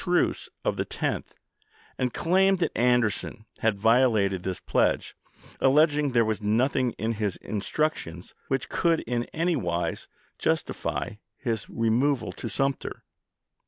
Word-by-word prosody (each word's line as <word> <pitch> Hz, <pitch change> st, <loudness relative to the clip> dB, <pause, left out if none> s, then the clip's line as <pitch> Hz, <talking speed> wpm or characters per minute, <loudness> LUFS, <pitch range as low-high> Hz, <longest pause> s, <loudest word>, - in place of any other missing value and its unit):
truce 180 Hz, -1 st, +1 dB, 0.2 s
of -, -, 0 dB
the -, -, +1 dB, 0.2 s
10th, -, -, -1 dB, 0.7 s
and 125 Hz, -1 st, -1 dB
claimed 190 Hz, +5 st, +3 dB
that 170 Hz, -3 st, -1 dB
Anderson 120 Hz, -2 st, +1 dB
had 110 Hz, -2 st, +1 dB
violated 110 Hz, -4 st, +3 dB
this 95 Hz, 0 st, -3 dB
pledge, -, -, +1 dB, 0.4 s
alleging 150 Hz, +1 st, +4 dB
there 120 Hz, -2 st, +3 dB
was 110 Hz, -1 st, -1 dB
nothing 125 Hz, +5 st, +2 dB
in 110 Hz, +1 st, -2 dB
his 105 Hz, -4 st, -1 dB
instructions 100 Hz, -, -3 dB
which 135 Hz, -1 st, -1 dB
could 165 Hz, -2 st, +1 dB
in 120 Hz, 0 st, -2 dB
any 170 Hz, +2 st, 0 dB
wise 85 Hz, -, -2 dB, 0.3 s
justify -, -, -1 dB, 0.3 s
his 115 Hz, -5 st, -3 dB
removal 120 Hz, +4 st, +1 dB
to 115 Hz, -, -6 dB
Sumter. 135 Hz, +5 st, -2 dB
120 Hz, 125 wpm, -27 LUFS, 110-145 Hz, 0.7 s, alleging